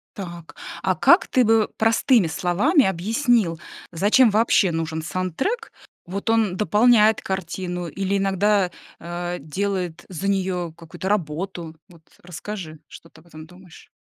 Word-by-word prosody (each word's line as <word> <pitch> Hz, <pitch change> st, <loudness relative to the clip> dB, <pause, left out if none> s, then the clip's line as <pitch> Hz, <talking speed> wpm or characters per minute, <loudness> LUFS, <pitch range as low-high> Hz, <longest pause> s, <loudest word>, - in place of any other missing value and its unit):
Так, 175 Hz, -4 st, -9 dB, 0.3 s
а -, -, +1 dB
как -, -, +4 dB
ты 255 Hz, -, +3 dB
бы 225 Hz, -1 st, +3 dB
простыми 225 Hz, -2 st, +3 dB
словами 195 Hz, -, +2 dB
объяснил, 200 Hz, -, +1 dB, 0.3 s
зачем 210 Hz, +8 st, +4 dB
вообще 210 Hz, -3 st, +3 dB
нужен 160 Hz, -1 st, -3 dB
саундтрек? 185 Hz, -, -3 dB, 0.3 s
Вот 200 Hz, +5 st, -5 dB
он 220 Hz, -5 st, +2 dB
дополняет 215 Hz, +1 st, +4 dB
картину, 180 Hz, -1 st, -4 dB
или 195 Hz, +4 st, -2 dB
иногда, 195 Hz, 0 st, +1 dB, 0.3 s
а, 175 Hz, +1 st, -5 dB
делает 180 Hz, +2 st, -3 dB
за 185 Hz, +2 st, -4 dB
неё 185 Hz, -3 st, -1 dB
какую-то 165 Hz, +3 st, -7 dB
работу? 170 Hz, -2 st, -3 dB
Вот 170 Hz, -2 st, -19 dB, 0.2 s
расскажи, 175 Hz, -2 st, -8 dB
что 165 Hz, -, -14 dB
ты 160 Hz, -, -19 dB
об 170 Hz, -, -24 dB
этом 155 Hz, -1 st, -11 dB
думаешь. 180 Hz, 0 st, -16 dB
185 Hz, 135 wpm, -22 LUFS, 170-210 Hz, 0.3 s, как